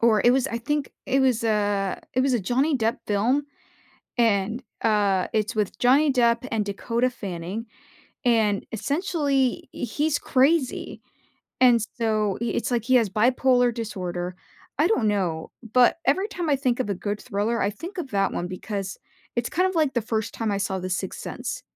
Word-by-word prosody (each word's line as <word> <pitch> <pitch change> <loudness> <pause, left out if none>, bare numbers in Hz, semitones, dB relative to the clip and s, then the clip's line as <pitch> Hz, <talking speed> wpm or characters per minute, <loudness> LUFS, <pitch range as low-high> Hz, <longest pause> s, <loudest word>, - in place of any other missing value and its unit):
Or 225 -2 +4
it 240 - +7
was, 265 -1 +2
I 230 - -3
think, 295 +4 -2 0.2
it 270 0 +2
was 255 -4 +2
a 205 -3 0
it 255 - +3
was 265 0 +2
a - - +2
Johnny 270 - +1
Depp 230 +1 0
film, 225 +8 +2 0.8
and 225 +1 +2 0.2
uh, 205 -4 +2
it's 215 +1 0
with 210 -3 -1
Johnny 275 +4 +4
Depp 235 -1 +2
and 220 -2 +1
Dakota 230 +5 0
Fanning, 195 -2 -5 0.6
and 220 -4 +2
essentially, 280 - 0
he's 295 +5 -1
crazy, 270 +1 +1 0.6
and 245 -2 +6 0.2
so 215 -3 0
i - - +1
it's 235 - -1
like 235 -2 +1
he 255 +2 +4
has 230 -4 +3
bipolar 245 +2 +3
disorder, 180 -5 -4 0.4
I 310 +4 +4
don't 325 - +2
know, 175 -6 -1 0.2
but 250 +5 +5
every 375 +9 +3
time 350 -6 -3
I 280 - +4
think 255 -2 0
of 210 - -1
a - - +1
good 205 +3 -4
thriller, 210 +4 -1
I 200 - +1
think 335 - -9
of 300 -7 -4
that 195 -1 +1
one 175 - -3
because 195 +1 -5 0.4
it's 240 0 0
kind 365 +3 +2
of 375 - -4
like 305 -4 +2
the 240 - +1
first 225 0 -2
time 225 -2 -1
I 200 - 0
saw 195 -1 -1
The 185 0 -4
Sixth 180 - -3
Sense. - - -5
230 Hz, 180 wpm, -25 LUFS, 205-260 Hz, 0.8 s, it